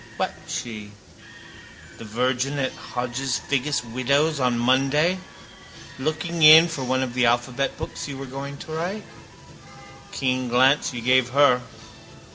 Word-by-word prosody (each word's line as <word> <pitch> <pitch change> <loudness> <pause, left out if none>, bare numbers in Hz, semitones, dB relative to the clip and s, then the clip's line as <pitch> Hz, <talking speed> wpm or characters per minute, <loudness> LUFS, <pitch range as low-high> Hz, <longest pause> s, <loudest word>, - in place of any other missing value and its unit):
What - - -2
she? 105 -3 -6 1.1
The 115 - -9
virgin 125 +5 -1
at 135 -2 -1
Hodges 125 +1 -3
Figgis' 140 0 -1
window 135 +6 +1
on 125 -2 +1
Monday 135 +9 +2 0.8
looking 160 +4 -3
in 160 +2 +9
for 150 -5 -5
one 130 +1 0
of 125 -2 -5
the 125 -1 +2
alphabet 120 +3 -1
books - - -6
you 140 -2 -7
were 135 - -7
going 140 +2 -7
to 155 - -10
write. 180 +6 -4 1.1
Keen 130 -1 -1
glance 130 +4 +3
you 120 -2 -6
gave 130 +1 +3
her. 130 -1 +4
130 Hz, 135 wpm, -23 LUFS, 125-145 Hz, 1.1 s, in